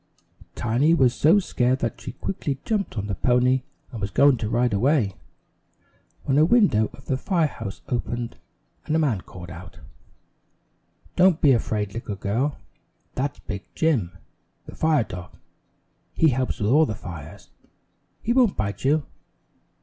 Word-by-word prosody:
Tiny 125 +8 +2
was 130 -6 +4
so 155 +9 +4
scared 130 -9 +1
that 115 - -3
she - - -7
quickly 145 -7 -3
jumped 205 - -1
on 105 - -2
the 100 - -3
pony 125 +5 +2 0.3
and 115 - -7
was 100 - -2
going 140 +5 +5
to 110 -2 -3
ride 120 0 +1
away, 115 -1 +2 1.1
when 135 +1 +2
a - - +6
window 170 - +4
of 135 - -15
the 130 - 0
fire 170 +2 +1
house 100 -8 -6
opened 120 -1 -3 0.5
and 155 - +1
a - - +4
man 135 - +1
called 90 -1 -11
out: 90 0 -11 1.4
"Don't 180 -2 +5
be 145 - +5
afraid, 105 -4 0
little 115 -3 -5
girl, 115 +10 -1 0.6
that's 135 +1 -2
Big 100 -1 -6
Jim, 110 - 0 0.5
the - - -10
fire 155 -5 +2
dog. 90 -3 -9 0.8
He 160 - +4
helps 130 -1 -1
with 105 +1 +1
all 155 +3 +5
the 110 - -3
fires. 85 -6 -10 0.7
He 235 - +1
won't 245 -6 +3
bite 100 -1 -3
you. 145 +2 +2
125 Hz, 155 wpm, -24 LUFS, 105-150 Hz, 1.4 s, a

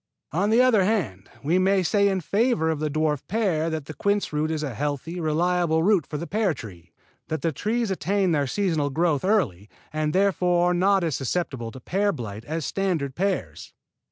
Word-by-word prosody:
On 185 +7 +1
the 230 +3 +5
other 230 -6 +4
hand, 180 - -1
we 165 +6 +2
may 190 0 +3
say 200 +3 +3
in 190 -2 0
favor 200 - +1
of 155 - -3
the 155 0 -1
dwarf 150 -1 0
pear 180 -7 0
that 160 -3 -4
the 155 - -7
quince 200 +2 -1
root 150 +1 0
is 155 -1 -2
a 140 -4 -3
healthy, 145 +7 -3
reliable 165 0 +1
root 195 -4 +3
for 150 - -4
the 170 - -5
pear 200 -3 0
tree; 90 -8 -11 0.4
that 160 +1 -3
the 165 - +1
trees 220 - -1
attain 190 0 0
their 145 -3 +1
seasonal 160 -3 0
growth 155 0 +1
early, 135 - 0 0.2
and 155 0 0
therefore 180 -2 +2
are - - +2
not 190 +1 +3
as 160 -5 0
susceptible 135 -4 -2
to 130 - -10
pear 200 +10 0
blight 110 - -6
as 160 -1 -3
standard 175 -9 -1
pears. 195 +7 -3
165 Hz, 195 wpm, -25 LUFS, 150-195 Hz, 0.4 s, the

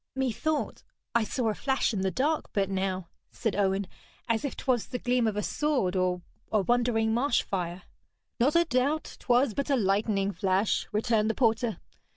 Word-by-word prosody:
'Methought 265 +4 -1 0.3
I 235 - +3
saw 230 +1 -1
a - - 0
flash 265 +1 0
in 195 - -1
the 190 - +1
dark 290 - 0
but 195 -1 0
now,' 190 -2 -1 0.2
said 220 -4 -2
Owen, 195 0 +1 0.4
'as 230 +2 +1
if 280 - -3
'twas 250 -4 0
the 250 - -3
gleam 245 -1 +1
of 215 - -1
a 210 - 0
sword 270 -12 0
or 180 -1 0 0.3
a 215 - +3
wandering 225 0 +2
marsh 245 +2 +2
fire.' 180 -1 -3 0.6
'Not 275 +7 +3
a 340 0 +5
doubt 280 +3 0
'twas 245 -1 +2
but 280 +4 -2
a 280 - +4
lightning 200 -2 +1
flash,' 190 +3 +1
returned 215 0 +1
the 225 - 0
porter. 230 -2 +1
225 Hz, 180 wpm, -28 LUFS, 195-255 Hz, 0.6 s, a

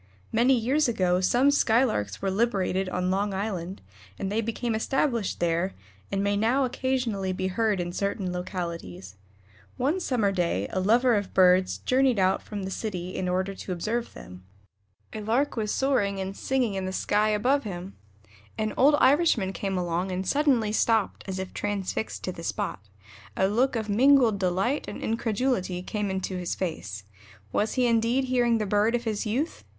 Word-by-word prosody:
Many 245 +4 +4
years 265 +6 +2
ago 185 -6 +1
some 250 +9 +4
Skylarks 220 - +1
were 195 - +1
liberated 195 -3 0
on 180 0 -1
Long 200 +1 0
Island, 190 -2 -4 0.3
and 195 - -3
they 220 +2 +1
became 230 +1 -2
established 235 -1 0
there, 170 +2 0 0.4
and 195 0 0
may 200 0 +1
now 235 +6 +2
occasionally 245 -7 -1
be 185 +1 -2
heard 210 0 0
in 175 0 -3
certain 200 -1 -2
localities. 170 - -5 0.6
One 295 +9 +1
summer 235 - +1
day 170 - 0
a 185 - -1
lover 235 +6 +3
of 205 -3 -2
birds 185 0 +4
journeyed 255 -2 +2
out 190 0 +2
from 205 -2 -6
the 190 - -4
city 185 -4 -4
in 180 - -2
order 185 +2 -1
to 190 - -7
observe 220 +7 -3
them. 90 +1 -11 0.7
A 215 - -5
Lark 235 +7 0
was 215 -3 -1
soaring 205 -8 +1
and 190 +1 -4
singing 255 -4 0
in 190 -1 -3
the - - -3
sky 210 +2 +1
above 250 +7 +2
him. 185 -2 -7 0.6
An 215 -1 -1
old 290 +3 +6
Irishman 265 - +3
came 195 -1 -2
along 175 +1 -1
and 185 +1 -3
suddenly 265 -7 +2
stopped 220 -1 +1
as 190 -1 -4
if 190 0 -5
transfixed 205 +1 -3
to 185 - -2
the 170 - -9
spot. 165 - -3 0.6
A 190 - +3
look 240 +6 +1
of 220 -2 -2
mingled 240 -1 +4
delight 190 +9 0
and - - -6
incredulity 220 -5 -1
came 210 0 -2
into 190 0 -3
his 180 -1 -3
face. 105 - -4 0.5
Was 215 - 0
he 255 -1 +2
indeed 235 +2 +2
hearing 245 -2 +2
the 215 - -1
bird 210 +3 +2
of 240 - -2
his 220 -1 -2
youth? 265 +10 -2
205 Hz, 175 wpm, -26 LUFS, 185-240 Hz, 0.7 s, old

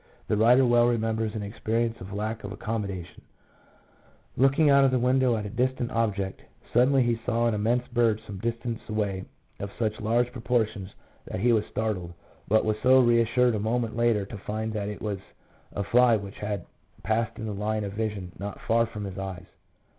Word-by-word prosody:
The - - +3
writer 120 +5 +5
well 120 0 +4
remembers 110 -2 0
an 105 - -3
experience 115 +2 -2
of 95 +2 -8
lack 110 +2 -3
of 100 - -6
accommodation; 100 -4 -5 1.1
looking 135 +4 +4
out 140 -1 +6
of 135 - +5
the 130 - +2
window 125 -1 +3
at 105 - -4
a - - -4
distant 125 +1 -1
object, 100 -5 -1 0.3
suddenly 130 +2 +4
he 120 -1 0
saw 120 -1 +1
an 115 - +2
immense 115 +4 0
bird 120 -3 +2
some 100 -2 -7
distance 115 +1 -3
away 100 -3 -2 0.3
of 100 - -4
such 110 -2 -1
large 120 +3 +1
proportions 115 -5 -1 0.4
that - - -5
he 120 +1 +4
was 110 -2 +2
startled, 100 -6 -3 0.3
but 110 +2 +3
was 110 +1 -1
reassured 125 -1 +4
a 105 - -1
moment 115 +2 -1
later 115 -4 +2
to 105 +2 -8
find 110 +2 -3
that 105 -1 -2
it 105 - -7
was 105 -3 -2 0.5
a 100 - -3
fly 120 +3 +5
which 100 0 -9
had 105 -3 -3 0.4
passed 110 +1 0
in 110 - -5
the 105 - -3
line 105 +1 -1
of 100 -1 -5
vision 105 -4 -3
not 100 0 -5
far 115 0 +2
from 105 -2 -7
his 95 -1 -6
eyes. 95 -2 -6
110 Hz, 185 wpm, -27 LUFS, 105-120 Hz, 1.1 s, out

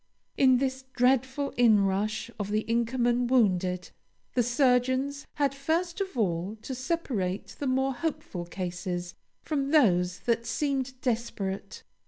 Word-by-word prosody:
In 260 -2 +5
this 260 0 -2
dreadful 260 +2 +1
inrush 215 -1 +2
of 205 -1 -3
the 215 +1 +1
Inkerman 240 +1 +1
wounded, 185 -7 +2 0.4
the 250 - +3
surgeons 255 +3 +1
had 285 -2 +1
first 330 +6 -1
of 380 -8 -4
all 190 0 -1
to 265 - -4
separate 250 - -2
the 285 - -2
more 265 +1 +1
hopeful 295 - -4
cases 175 0 -4 0.3
from 280 -3 -1
those 180 - +3
that 235 +1 0
seemed 265 -3 -1
desperate. 210 -5 -3
245 Hz, 125 wpm, -28 LUFS, 200-270 Hz, 0.4 s, In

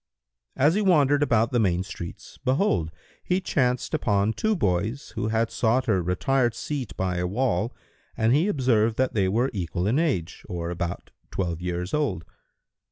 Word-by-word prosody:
As 145 +4 +4
he 210 - +1
wandered 145 -7 +4
about 115 -5 +2
the 120 - +2
main 90 -4 +2
streets, 90 -3 -9
behold, 130 - +1 0.3
he 180 +1 +1
chanced 125 -9 0
upon 100 +1 +1
two 220 - 0
boys 105 - -1
who 110 -1 -2
had 115 +1 0
sought 120 +2 +1
a 95 -5 +2
retired 120 +8 +1
seat 130 -10 -4
by 90 -1 -1
a 90 0 0
wall 115 +2 0 0.5
and 110 +2 +3
he 155 +7 +3
observed 115 - +2
that 130 0 +1
they 100 -3 +2
were 120 +7 +1
equal 90 -2 -2
in 120 +8 +2
age, 115 - -1
or 85 -1 -3
about 85 0 -4 0.2
twelve 85 -3 -3
years 90 0 -3
old. 110 - 0
110 Hz, 165 wpm, -25 LUFS, 90-135 Hz, 0.5 s, As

